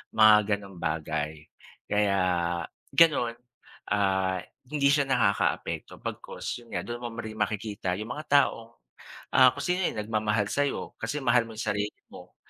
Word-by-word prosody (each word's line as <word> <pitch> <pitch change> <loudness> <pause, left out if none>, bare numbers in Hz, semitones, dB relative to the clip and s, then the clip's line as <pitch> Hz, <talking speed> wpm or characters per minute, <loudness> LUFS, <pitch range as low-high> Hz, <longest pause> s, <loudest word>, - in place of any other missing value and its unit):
mga 105 -1 +6
gano'ng 100 -3 -12
bagay. 75 -1 -2 0.5
Kaya 105 -1 +2 0.7
gano'n, 145 -8 +4 0.6
ah, 95 -2 +1 0.3
hindi 145 -1 +2
siya 145 -1 +3
nakakaapekto 115 -6 0
bagkus - - -5
'yon 120 - -18
nga, - - -1
do'n 120 +1 -5
mo 120 - -4
rin 110 -2 -5
makikita 105 -3 -2
'yong 110 +3 -6
mga 150 +1 -7 0.2
taong, 115 -3 -4 0.6
ah, 130 -1 +8
kung 140 - -5
sino 180 +1 +1
'yong 105 - -2
nagmamahal 105 -1 0
sa'yo, 145 0 -1
kasi 150 - -2
mahal 120 -1 +4
mo 110 - -10
'yong 115 - -3
sarili 105 0 -2
mo, - - -13
110 Hz, 150 wpm, -27 LUFS, 100-125 Hz, 0.7 s, ah